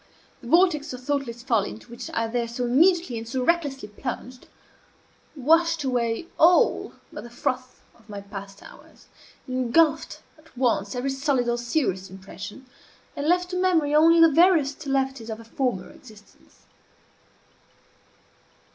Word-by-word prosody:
The 240 Hz, -, -11 dB
vortex 315 Hz, -2 st, +3 dB
of 250 Hz, 0 st, -9 dB
thoughtless 260 Hz, -4 st, -3 dB
folly, 230 Hz, -6 st, +1 dB
into 230 Hz, +2 st, -12 dB
which 235 Hz, -, -8 dB
I 230 Hz, -, +1 dB
there 235 Hz, +1 st, -2 dB
so 235 Hz, +2 st, -4 dB
immediately 315 Hz, 0 st, +3 dB
and 225 Hz, 0 st, -9 dB
so 255 Hz, +1 st, -2 dB
recklessly 285 Hz, -8 st, 0 dB
plunged, 250 Hz, +3 st, -7 dB, 0.9 s
washed 325 Hz, +3 st, +2 dB
away 245 Hz, +1 st, -1 dB
all 345 Hz, +2 st, +4 dB, 0.2 s
but -, -, -7 dB
the 240 Hz, -, -10 dB
froth 255 Hz, +1 st, -4 dB
of 225 Hz, -1 st, -25 dB
my 205 Hz, -1 st, -6 dB
past 200 Hz, 0 st, -10 dB
hours, -, -, -16 dB, 0.4 s
engulfed 255 Hz, +5 st, +1 dB, 0.2 s
at 310 Hz, -4 st, -23 dB
once 230 Hz, -5 st, 0 dB
every 255 Hz, +2 st, -2 dB
solid 270 Hz, -2 st, 0 dB
or 240 Hz, 0 st, 0 dB
serious 240 Hz, -, -1 dB
impression, 195 Hz, +6 st, -10 dB, 0.5 s
and 285 Hz, +1 st, -3 dB
left 360 Hz, +1 st, +1 dB
to -, -, -3 dB
memory 340 Hz, -6 st, +2 dB
only 325 Hz, +2 st, +6 dB
the 330 Hz, -1 st, +7 dB
veriest 315 Hz, -4 st, +3 dB
levities 265 Hz, -3 st, -1 dB
of 220 Hz, 0 st, -5 dB
a -, -, -11 dB
former 230 Hz, -5 st, -3 dB
existence. 215 Hz, -4 st, -19 dB
255 Hz, 145 wpm, -24 LUFS, 230-310 Hz, 0.9 s, the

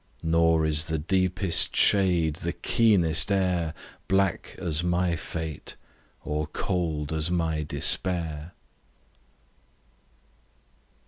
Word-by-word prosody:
Nor 80 Hz, -1 st, +2 dB
is 80 Hz, +1 st, +3 dB
the 80 Hz, -1 st, -2 dB
deepest 90 Hz, +2 st, +2 dB
shade, 90 Hz, -6 st, +2 dB
the 85 Hz, +1 st, -4 dB
keenest 100 Hz, -7 st, +2 dB
air, 90 Hz, -4 st, 0 dB, 0.3 s
Black 95 Hz, -2 st, 0 dB
as 85 Hz, -3 st, -1 dB
my 90 Hz, 0 st, 0 dB
fate, 80 Hz, -1 st, -6 dB, 0.5 s
or 75 Hz, 0 st, -2 dB
cold 80 Hz, -3 st, -3 dB
as 80 Hz, +1 st, 0 dB
my 80 Hz, -3 st, -1 dB
despair. 80 Hz, +2 st, 0 dB
85 Hz, 90 wpm, -26 LUFS, 80-90 Hz, 0.5 s, is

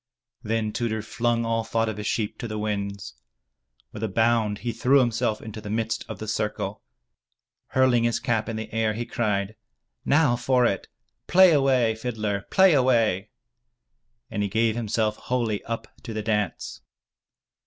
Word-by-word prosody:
Then 110 Hz, -1 st, -1 dB
Tudur 110 Hz, -2 st, -2 dB
flung 120 Hz, -1 st, 0 dB
all 115 Hz, 0 st, 0 dB
thought 115 Hz, 0 st, 0 dB
of 110 Hz, -1 st, -3 dB
his 105 Hz, -, -4 dB
sheep 105 Hz, -3 st, -2 dB
to 120 Hz, -, -4 dB
the 110 Hz, -1 st, -4 dB
winds. 100 Hz, 0 st, -3 dB, 0.8 s
With -, -, -8 dB
a 110 Hz, -, 0 dB
bound 110 Hz, 0 st, +1 dB
he 120 Hz, -, 0 dB
threw 125 Hz, +5 st, +3 dB
himself 120 Hz, -3 st, 0 dB
into 110 Hz, -1 st, -7 dB
the 105 Hz, -, -7 dB
midst 110 Hz, +1 st, -2 dB
of 110 Hz, -, -5 dB
the 110 Hz, -, -7 dB
circle. 105 Hz, 0 st, -2 dB, 0.9 s
Hurling 130 Hz, -3 st, +3 dB
his 120 Hz, -, +1 dB
cap 110 Hz, -2 st, -1 dB
in 115 Hz, -, -3 dB
the 110 Hz, -1 st, -6 dB
air, 110 Hz, -1 st, +1 dB
he 120 Hz, +2 st, -3 dB
cried, 105 Hz, -4 st, -1 dB, 0.5 s
"Now 145 Hz, -4 st, +3 dB
for 125 Hz, 0 st, +2 dB
it! 100 Hz, -5 st, -1 dB, 0.4 s
Play 185 Hz, 0 st, +7 dB
away, 130 Hz, -5 st, +3 dB
fiddler! 110 Hz, -3 st, -3 dB
Play 190 Hz, -2 st, +5 dB
away 115 Hz, -7 st, +2 dB, 0.4 s
!* -, -, -54 dB
' -, -, -42 dB
And 105 Hz, -, -2 dB
he 100 Hz, -, 0 dB
gave 110 Hz, +2 st, +1 dB
himself 110 Hz, -2 st, -1 dB
wholly 115 Hz, -5 st, -2 dB
up 115 Hz, 0 st, -4 dB
to 115 Hz, -, -7 dB
the 110 Hz, -, -2 dB
dance. 105 Hz, -4 st, -2 dB
110 Hz, 170 wpm, -25 LUFS, 105-120 Hz, 0.9 s, Play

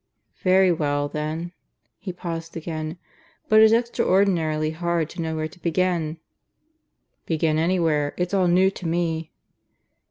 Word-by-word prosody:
"Very 185 Hz, 0 st, +4 dB
well, 145 Hz, -3 st, 0 dB
then." 155 Hz, +3 st, -4 dB, 0.5 s
He 190 Hz, -1 st, -5 dB
paused 165 Hz, -2 st, -6 dB
again. 160 Hz, 0 st, -5 dB, 0.5 s
"But 215 Hz, -, +6 dB
it's 220 Hz, 0 st, +7 dB
extraordinarily 185 Hz, -9 st, +2 dB
hard 170 Hz, -1 st, -1 dB
to 175 Hz, -, -6 dB
know 160 Hz, -1 st, -2 dB
where 155 Hz, 0 st, -2 dB
to 170 Hz, +3 st, -18 dB
begin." 170 Hz, -2 st, 0 dB, 1.1 s
"Begin 155 Hz, -1 st, +1 dB
anywhere. 160 Hz, -4 st, +1 dB
It's 180 Hz, +1 st, -2 dB
all 190 Hz, -2 st, +3 dB
new 185 Hz, +2 st, +4 dB
to 180 Hz, -3 st, -6 dB
me." 165 Hz, -1 st, -1 dB
165 Hz, 130 wpm, -24 LUFS, 155-180 Hz, 1.1 s, it's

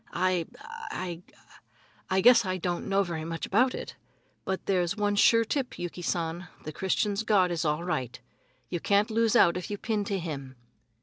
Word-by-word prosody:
"I 180 Hz, -2 st, +1 dB, 0.4 s
I 175 Hz, -2 st, -5 dB, 0.9 s
I 190 Hz, 0 st, +2 dB
guess 240 Hz, +2 st, +7 dB
I 185 Hz, -1 st, -2 dB
don't 175 Hz, -1 st, -3 dB
know 200 Hz, 0 st, +3 dB
very 170 Hz, -4 st, -4 dB
much 165 Hz, 0 st, -4 dB
about 250 Hz, +6 st, +2 dB
it. -, -, -7 dB, 0.5 s
But 190 Hz, 0 st, -3 dB
there's 185 Hz, 0 st, +1 dB
one 205 Hz, -1 st, +1 dB
sure 230 Hz, +2 st, +5 dB
tip, 265 Hz, +2 st, -2 dB
Yuki 175 Hz, 0 st, -5 dB
San, 170 Hz, 0 st, -2 dB, 0.2 s
the 155 Hz, -, -6 dB
Christians' 200 Hz, +3 st, 0 dB
God 200 Hz, -5 st, +3 dB
is 170 Hz, -2 st, -1 dB
all 150 Hz, +2 st, 0 dB
right. 130 Hz, -8 st, -3 dB, 0.5 s
You 175 Hz, -, -3 dB
can't 205 Hz, +5 st, +2 dB
lose 225 Hz, 0 st, +2 dB
out 175 Hz, -1 st, +5 dB
if 180 Hz, -, -6 dB
you 205 Hz, -, -3 dB
pin 215 Hz, -1 st, -1 dB
to 200 Hz, -1 st, -1 dB
him." 140 Hz, -7 st, -6 dB
185 Hz, 180 wpm, -28 LUFS, 170-205 Hz, 0.9 s, guess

